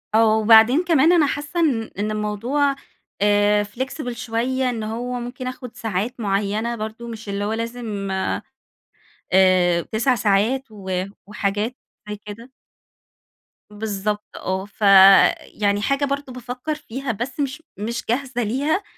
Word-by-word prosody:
آه، 220 -1 +5
وبعدين 225 +7 +6
كمان 330 -2 +4
أنا 330 -4 +5
حاسَّة 295 +5 -3
إن 275 -9 +2 0.2
إن 210 +1 -1
الموضوع 230 +7 0 0.5
آآ، 205 0 +3
flexible 245 +5 -5
شوية 250 +2 -1
إن 230 -3 -3
هو 245 +3 -3
ممكن 245 +1 -6
آخد 250 -1 -7
ساعات 225 +4 -3
معيّنة 210 +2 -1
برضه 220 +1 -6
مش 220 -3 -8
اللي 200 0 -2
هو 215 - -1
لازم 225 -4 -4 1.2
آآ، 185 -2 +4
9 240 +4 +2
ساعات 225 +4 +1
و 190 -3 -3 0.2
وحاجات 210 +3 -2 0.3
زي 210 - -3
كده. 230 +5 -10 1.2
بالضبط، 210 0 -3
آه 190 +1 -3
ف 205 +1 -23 0.6
يعني 205 -1 -1
حاجة 275 +4 +1
برضه 280 -1 -4
بافكَّر 250 +5 -5
فيها 270 -3 -5
بس 245 +6 -5
مش 285 +3 -3
مش 230 +3 -3
جاهزة 245 -1 -1
ليها 285 - 0
230 Hz, 135 wpm, -22 LUFS, 210-255 Hz, 1.2 s, وبعدين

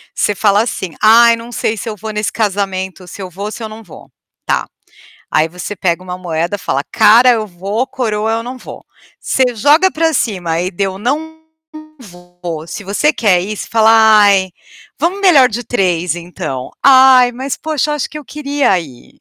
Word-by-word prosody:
Você 205 - 0
fala 205 +1 +2
assim: 190 -7 -5
"Ai 230 +2 +6
não 230 +1 -10
sei 220 -1 -2
se 225 +3 -5
eu 215 - -5
vou 215 +2 -6
nesse 210 0 -2
casamento, 190 -3 -3
se 200 - -10
eu 185 - -6
vou 195 +4 -7
ou 210 - -5
se - - -9
eu 220 - -4
não 220 +1 -11
vou." 175 - -15 0.4
Tá, - - -1 0.6
aí 155 - +2
você 180 +5 -7
pega 180 -1 -1
uma 180 0 -6
moeda, 175 +2 -3
fala: 140 -4 -2
"Cara 235 +4 +5
eu 220 -2 -1
vou, 200 +7 -3
coroa 220 -3 -2
eu 225 0 -2
não 250 +2 -7
vou." - - -11 0.3
Você 255 -2 0
joga 300 - +4
para 325 0 0
cima 175 - -1
e 180 - -2
deu 190 0 -3
não 300 +8 -3 0.7
vou, 180 -4 -9
e - - -17
se - - -7
você 250 +11 +1
quer 195 -9 +2
ir, 210 +2 -5
fala: 225 -1 +2
"Ai, 210 -4 +5 0.5
vamos 370 +4 -1
melhor 295 -10 +5
de 235 +3 -4
3 180 -7 0
então. 170 -7 -6
Ai 260 -2 +6
mas 260 +2 -4
poxa, 305 -1 -2
eu - - 0
acho 295 - -3
que 300 - -7
eu 300 - -11
queria 285 -8 0
ir." 135 -7 -14
210 Hz, 195 wpm, -15 LUFS, 185-245 Hz, 0.7 s, Ai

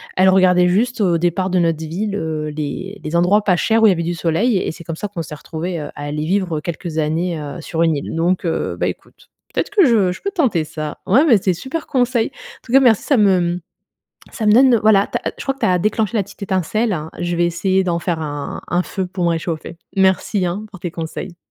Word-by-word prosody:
Elle 190 +1 +5
regardait 180 -1 +5
juste 230 +5 +1
au 175 -4 +3
départ 175 +2 0
de 185 - +2
notre 165 -2 +2
ville, 185 +6 -3
heu, 160 -5 -3
les 180 +7 -5
les 155 +2 -3
endroits 180 +5 +3
pas 185 -4 +2
chers 225 +4 +2
où - - +8
il - - +7
y - - +5
avait 170 - -2
du 175 +1 -2
soleil 175 +8 +1
et - - -1
c'est 165 - -11
comme 165 - -4
ça 210 - -4
qu'on 185 -4 -5
s'est 150 - -8
retrouvées, 170 +3 -5
heu, 145 - -5
à 145 - -6
aller 150 +1 -3
vivre 175 -3 0
quelques 165 0 -5
années, 160 +2 -1
heu, 145 0 -6
sur 165 +1 -1
une 165 -2 +2
île. 140 - -5
Donc, 175 +3 0
heu, 165 - -2
bah, - - +1
écoute. - - -9 0.2
Peut-être - - -1
que 410 -4 +5
je 215 -8 +3
je - - -12
peux 400 - -2
tenter 260 - +1
ça. 155 -1 -6
Ouais, 260 +11 +4
mais 245 -9 +6
c'est 185 -1 +1
super 265 - -5
conseil. 245 -3 +1
En 270 - -15
tout 235 - -10
cas, 270 - +8
merci, 240 -6 +4
ça 280 - +2
me, 195 -4 +4
mmh, 175 0 -1 0.7
ça 225 - -4
me - - +6
donne, 255 +2 +6
heu, - - +2
voilà, 205 -2 +5
tu - - -2
as - - -22
ah - - 0
je - - -6
crois 270 - 0
que 270 - -23
tu - - +1
as 180 -1 +3
déclenché 215 +3 0
la 205 - +1
petite 205 +2 -16
étincelle. 195 +2 0 0.2
Je 175 0 -1
vais 175 0 +2
essayer 190 +3 +1
d'en 170 -2 0
faire 170 -1 -2
un 145 -2 -5
un 175 +1 +1
feu 190 0 -3
pour 180 -1 -3
me - - +3
réchauffer. 165 0 -3 0.2
Merci 190 +1 +2
hein, 195 +5 -4
pour 190 - -11
tes 175 - -4
conseils. 170 +2 -6
180 Hz, 260 wpm, -19 LUFS, 165-210 Hz, 0.7 s, où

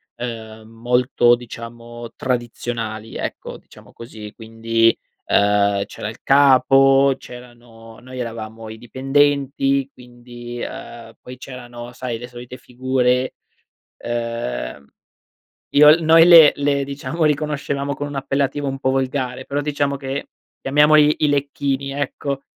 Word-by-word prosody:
ehm, 110 -2 -7
molto 120 +1 +2
diciamo 120 0 -10
tradizionali, 120 -3 -4
ecco, - - -6
diciamo - - -18
così, 110 -3 -10
quindi, 115 0 +1 0.3
uhm, 100 -1 +2
c'era - - -7
il 115 - -12
capo, 135 0 +5
c'erano 120 -2 -14
noi 130 +1 -10
eravamo 115 -1 -7
i 110 - -9
dipendenti, 135 +2 0
quindi 120 -1 -11
uhm, 115 -1 -9
poi 125 0 -11
c'erano, 120 -2 -10
sai, 125 -2 -5
le 120 - -8
solite 125 +1 -10
figure, 125 0 -1 0.7
uhm, 115 - -4 0.9
Io 150 +1 +8
l 165 +2 +5
noi 165 +1 +7
le 165 -4 +9
le 140 -1 0
diciamo, 145 +4 -4
riconoscevamo 145 -2 -1
con 145 - -4
un 145 - -8
appellativo 140 +1 -1
un 135 0 -4
po' 130 - 0
volgare, 130 -1 -2
però 140 +1 -2
diciamo 145 -1 -1
che 135 0 -5 0.3
chiamiamoli 150 +2 +4
i 155 - +2
lecchini 140 -1 -1
ecco; 140 0 -4
125 Hz, 120 wpm, -20 LUFS, 115-140 Hz, 0.9 s, le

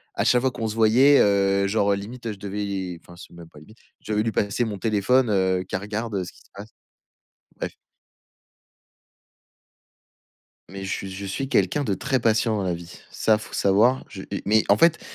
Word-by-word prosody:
à - - 0
chaque 125 -1 +4
fois 130 - +1
qu'on 115 -2 -4
se 110 - -4
voyait, 120 +6 +5
heu, 100 -1 +3
genre 100 0 +2
limite, 115 +5 -8
heu, 110 - -2
je 100 - -13
devais 100 -3 -4
enfin 90 - -15
c'est 85 - -14
même 85 -1 -12
pas 75 - -15
limite, 110 +9 -17 0.2
je - - -7
devais 105 0 +1
lui 115 - -1
passer 105 +3 0
mon 105 -3 -4
téléphone, 110 +5 +2
heu, 95 -2 +1
qu'elle 95 - -4
regarde, 105 +2 -4
heu, 95 - -1
ce 90 - -9
qui - - -21
se - - -25
passe. 105 +2 -10 0.9
Bref. - - -5 3.0
Mais 95 0 -7
che 95 - -4
je 95 +1 -7
suis 130 +8 -4
quelqu'un 145 0 +1
de 105 - -1
très 130 +4 -1
patient 110 0 +1
dans 100 - -2
la 90 -2 -1
vie, 85 0 -11 0.2
ça 110 -1 +2
faut 105 - -11
savoir. 110 +7 +3
Je, 95 - -8
heu - - -14
et 100 - -4
mais, 110 +1 +3
en - - +5
fait, 170 0 +4
105 Hz, 205 wpm, -24 LUFS, 95-115 Hz, 3.0 s, voyait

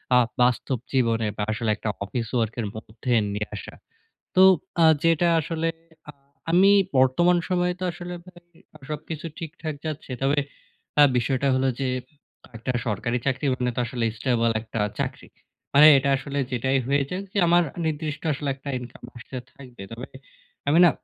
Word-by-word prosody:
আ - - +7 0.2
বাস্তব 125 +1 +2 0.2
জীবনে 115 -4 +2
বা 105 - -1
আসলে 110 +1 -2
একটা 110 - -4
office 115 +3 -4
work 115 -1 0
এর 110 - -2
মধ্যে 110 +3 -6 0.2
নিয়ে 105 0 -3
আসা। 100 - -8 0.6
তো 185 - +6 0.4
আ - - +7 0.2
যেটা 165 +1 +3
আসলে 165 +1 -2 0.4
আ - - -5 0.4
আমি 190 +4 +6 0.3
বর্তমান 150 +8 +4
সময়ে 180 -1 +1
তো - - -4
আসলে 175 +1 -7
ভাই 175 -1 -15 0.3
আ - - -10
সবকিছু 155 +1 -5
ঠিকঠাক 160 -2 -6
যাচ্ছে। 155 -3 -5
তবে 140 +2 +2 0.6
আ - - +10
বিষয়টা 130 +3 0
হলো 130 0 +2
যে 135 - 0 0.7
একটা 115 +3 -3 0.2
সরকারি 120 +3 -1
চাকরি 135 +1 -1
মানে 125 0 -1
তো - - -2
আসলে 120 -1 -2
স্টেবল 115 -2 +1
একটা 110 0 -6 0.2
চাকরি। - - -4 0.5
মানে 145 +2 +9
এটা 135 +1 +1
আসলে 140 +2 -6
যেটাই 130 +2 +1
হয়ে 140 +1 +2
যাক, 185 +2 -4
যে - - -3
আমার 175 +1 +5 0.2
নির্দিষ্ট 155 -1 -3
আসলে 140 +1 -3
একটা 140 +1 -9
ইনকাম 125 -1 -11
আসতে 125 +2 -8 0.2
থাকবে। 125 -7 -12
তবে 115 +3 -7 0.6
আমি 155 +4 +4
না - - +7
135 Hz, 165 wpm, -24 LUFS, 120-160 Hz, 0.7 s, আ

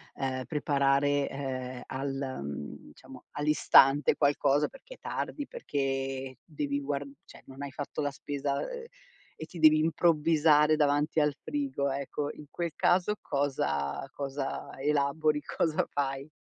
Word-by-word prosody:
uhm, 130 -1 -2
preparare, 145 -1 +2
uhm, 130 -2 -5
al, 135 0 -4
mhmm, 70 +1 -6
diciamo 130 - -14
all'istante 145 -1 +5
qualcosa 145 0 +2
perché - - -13
è - - -27
tardi, 290 - -4
perché 135 - -3
devi 145 -3 -3
guar 140 0 -2 0.2
cioè - - -15
non 135 +1 -11
hai 140 - -5
fatto 145 +2 -5
la 145 - 0
spesa, 140 0 -3
uhm, - - -2 0.7
e 160 - -7
ti 170 +1 -10
devi 155 -1 +7
improvvisare 155 -1 +4
davanti 150 +1 +2
al 150 -1 +2
frigo 275 - -1
ecco, 140 +2 -3
in 150 - -11
quel 170 +1 -3
caso 185 +4 +2
cosa 75 - -1
cosa 140 -1 -4
elabori, 150 +1 +1
cosa 160 -2 0
fai? 135 0 -2
145 Hz, 135 wpm, -29 LUFS, 135-150 Hz, 0.7 s, devi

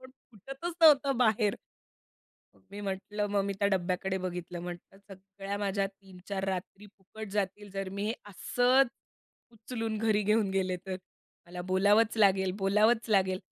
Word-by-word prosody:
पण 260 - -12 0.2
फुटतच 270 - -6
नव्हतं 280 -4 +6
बाहेर. 215 -3 +3 1.2
मी 205 +1 -7
म्हंटलं, 205 +1 -3
मग 200 -1 +2
मी 200 - -1
त्या 200 0 +2
डब्याकडे 190 0 -1
बघितलं. 180 -1 -5
म्हटलं 175 +2 -9 0.2
सगळ्या 195 +1 -7
माझ्या 200 -1 0
3-4 195 0 -7
रात्री 190 +2 -5
फुकट 215 +3 -9
जातील, 205 0 -2
जर 195 0 -4
मी 210 +2 0 0.2
असंच 245 +7 +3 0.6
उचलून 225 -1 -4
घरी 215 -1 +2
घेऊन 210 0 +2
गेले 190 -1 0
तर. 185 - -3 0.5
मला 180 +1 -7
बोलावंच 205 +4 +4
लागेल, 190 -3 +4
बोलावंच 210 +4 +3
लागेल 190 -2 +3
200 Hz, 140 wpm, -30 LUFS, 190-220 Hz, 1.2 s, नव्हतं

